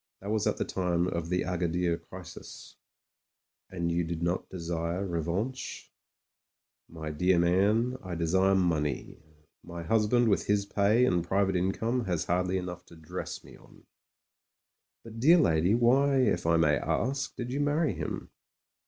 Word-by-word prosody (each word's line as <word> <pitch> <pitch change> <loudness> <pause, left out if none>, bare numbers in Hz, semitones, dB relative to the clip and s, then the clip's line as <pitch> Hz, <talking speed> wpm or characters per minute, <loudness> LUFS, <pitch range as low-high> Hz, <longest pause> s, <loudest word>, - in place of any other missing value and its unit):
That 100 +2 -5
was 110 -1 +1
at 105 - 0
the - - -1
time 90 -2 0
of 85 -2 -3
the 90 0 0
Agadir 90 -1 0
crisis." - - -11 0.9
"And 85 -2 -2
you 85 +1 +1
do 85 +1 -3
not 85 +2 -2
desire 85 +1 -3
revanche?" 90 +9 -3 1.0
"My 80 -2 -6
dear 90 +4 +2
man, 100 +8 +2
I 90 -2 -5
desire 95 +4 +2
money. 80 -7 -1 0.4
My 85 -1 -7
husband 115 +5 +2
with 100 - +1
his 100 -1 +2
pay 105 +4 +3
and 90 -7 +1
private 95 +2 +1
income 110 +7 0
has 90 -4 -1
hardly 90 +1 0
enough 90 -1 -5
to - - -15
dress 80 -1 -7
me - - -14
on." - - -19 1.2
"But, 115 0 -10
dear 160 +9 +6
lady, 90 - +3
why, 135 +4 +3
if 105 -10 +2
I 85 0 +4
may 75 -3 +3
ask, 135 - -2
did 125 0 -5
you 140 - -1
marry 145 +1 +1
him - - -5
90 Hz, 155 wpm, -29 LUFS, 85-110 Hz, 1.2 s, dear